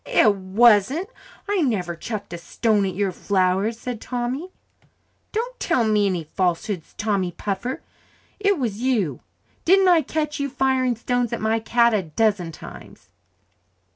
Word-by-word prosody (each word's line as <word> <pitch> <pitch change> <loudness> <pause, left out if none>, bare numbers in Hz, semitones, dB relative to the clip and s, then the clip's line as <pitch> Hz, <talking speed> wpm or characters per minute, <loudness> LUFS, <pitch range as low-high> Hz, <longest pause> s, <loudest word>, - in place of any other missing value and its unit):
"It 210 -2 +4
wasn't 220 - +3 0.4
I 405 -2 +1
never 190 - 0
chucked 205 +1 -6
a 170 - -5
stone 210 +2 +1
at 185 - -4
your 200 0 0
flowers," 190 +4 0
said 245 -2 -5
Tommy. 250 +7 -3 0.8
"Don't - - -3
tell 245 - +1
me 210 -2 +2
any 180 -4 -1
falsehoods, 180 +2 -2
Tommy 200 -4 0
Puffer. 205 +8 -4 0.6
It 400 -2 +2
was 225 -7 -2
you. 215 - 0 0.4
Didn't 380 +1 +5
I 340 -2 +5
catch 300 +1 -3
you 280 0 -1
firing 260 -2 +1
stones 245 0 -1
at 235 - -2
my 220 +1 +1
cat 235 +1 +3
a 210 - +2
dozen 185 +1 0
times?" - - -12
225 Hz, 145 wpm, -23 LUFS, 195-260 Hz, 0.8 s, Didn't